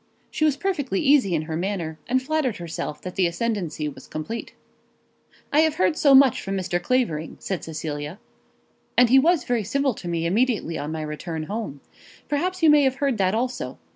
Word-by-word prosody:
She 310 - +1
was 295 -3 +2
perfectly 290 - -1
easy 270 - +4
in 155 - -1
her 160 0 -4
manner, 170 -3 -3
and 260 +1 +1
flattered 295 -5 0
herself 165 -3 -5
that 185 - -5
the 185 -2 +2
ascendancy 175 -5 -2
was 135 -2 -9
complete. 220 +10 -6 1.0
"I 295 - +5
have 315 -1 +3
heard 185 +7 +2
as - - -5
much 275 -3 +6
from 195 0 -3
Mr. 175 -1 -1
Clavering," 175 -10 -1
said 190 -3 -4
Cecilia. 155 +1 -5 0.8
"And 245 -1 +6
he 265 - +8
was 325 0 +3
very 240 -3 0
civil 275 +5 0
to 185 - -9
me 170 -1 -1
immediately 210 -2 +1
on 150 +2 -4
my 160 -1 -3
return 155 +1 -5
home. 200 -7 -5 0.5
Perhaps 360 +5 -1
you 320 - +7
may 300 -1 +6
have 265 -2 +2
heard 270 -5 0
that 190 +1 +2
also. 245 - -3
205 Hz, 190 wpm, -24 LUFS, 165-270 Hz, 1.0 s, he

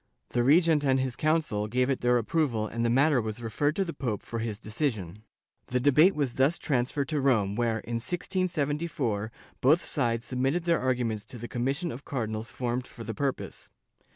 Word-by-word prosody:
The 120 - +1
regent 155 +2 +4
and 135 -1 +3
his 130 -2 -1
council 155 -9 0
gave 125 +3 +1
it 135 -2 -1
their 125 0 +4
approval 120 -2 0
and 115 +2 -3
the 120 - +2
matter 135 +2 +4
was 110 0 -4
referred 145 +6 -1
to 195 - +1
the 170 - -5
pope 115 -7 -3
for 115 - -5
his 110 -2 -3
decision.^ 105 - -3 0.5
The 125 - 0
debate 150 +8 +5
was 140 -5 -1
thus 135 +7 +2
transferred 135 0 -1
to 150 -3 0
Rome 110 -7 +2
where, 115 -1 0
in 120 0 -3
1674, 145 - -1 0.3
both 150 +6 +4
sides 120 -4 -1
submitted 135 +7 0
their 170 -1 +2
arguments 120 -5 0
to 125 0 -8
the 120 +1 -6
commission 135 +9 -1
of 130 +4 -8
Cardinals 110 -3 -3
formed 125 0 -3
for 115 - -10
the 115 0 -4
purpose. 135 +4 -4
125 Hz, 185 wpm, -28 LUFS, 115-145 Hz, 0.5 s, debate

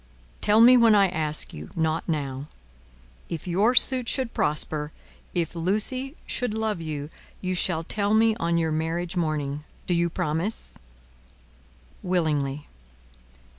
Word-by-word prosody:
"Tell 210 +2 +5
me 250 +2 +8
when 230 -3 +6
I 200 -2 +5
ask 155 -3 -2
you, 75 +1 -8
not 160 0 -1
now. 140 -3 -3 0.8
If 165 -3 -5
your 205 +8 +2
suit 255 -2 +4
should 260 -4 -1
prosper, 150 0 -1 0.4
if 170 -3 -1
Lucie 215 - -2
should 245 -3 -2
love 220 -5 -1
you, 150 -1 -5 0.3
you 185 0 -2
shall 175 -2 +1
tell 205 +4 0
me 220 0 +4
on 170 -5 0
your 165 -1 0
marriage 165 +3 -2
morning. 150 -4 -2 0.2
Do 180 - 0
you 170 0 +2
promise?" 170 +4 -1 1.3
"Willingly. 150 -6 -1
170 Hz, 130 wpm, -25 LUFS, 155-210 Hz, 1.3 s, me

